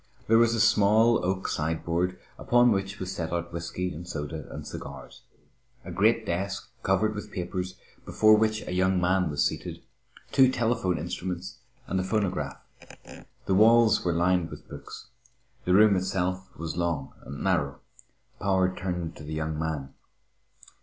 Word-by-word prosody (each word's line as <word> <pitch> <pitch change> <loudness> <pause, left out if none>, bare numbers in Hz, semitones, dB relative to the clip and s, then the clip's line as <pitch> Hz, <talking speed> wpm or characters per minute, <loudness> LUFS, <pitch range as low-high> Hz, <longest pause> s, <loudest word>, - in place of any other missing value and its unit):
There 115 +1 +5
was 115 0 +4
a - - -1
small 110 +1 +4
oak 95 +1 -1
sideboard, 85 +3 -1 0.2
upon 120 0 +4
which 95 0 -1
was 95 0 -4
set 80 -2 -4
out 85 0 -3
whisky 85 +2 -3
and 85 +3 -8
soda 75 -2 -5
and - - -7
cigars; - - -9 0.6
a 95 - -6
great 110 +5 +2
desk, 100 +3 -3
covered 105 +2 +1
with 105 0 -7
papers, 90 0 -4 0.3
before 110 0 +5
which 110 0 +1
a - - -4
young 95 0 +2
man 90 0 +2
was 75 -1 +1
seated; - - -4 0.5
two 130 -1 +5
telephone 115 -7 0
instruments 90 +2 -5 0.3
and 95 - -1
a - - 0
phonograph. 95 -8 -1 0.9
The 95 - +1
walls 115 +2 +5
were 90 - +1
lined 85 0 +2
with - - -11
books. - - -10 0.6
The 90 - +3
room 105 0 +6
itself 95 0 -1
was 80 -1 -4
long 85 -6 -2
and 70 - -7
narrow. 70 0 0 0.6
Power 95 -1 +1
turned 90 -2 -3
to - - -10
the 75 +1 -6
young 80 0 -2
man. 75 -4 -3
90 Hz, 155 wpm, -27 LUFS, 85-105 Hz, 0.9 s, room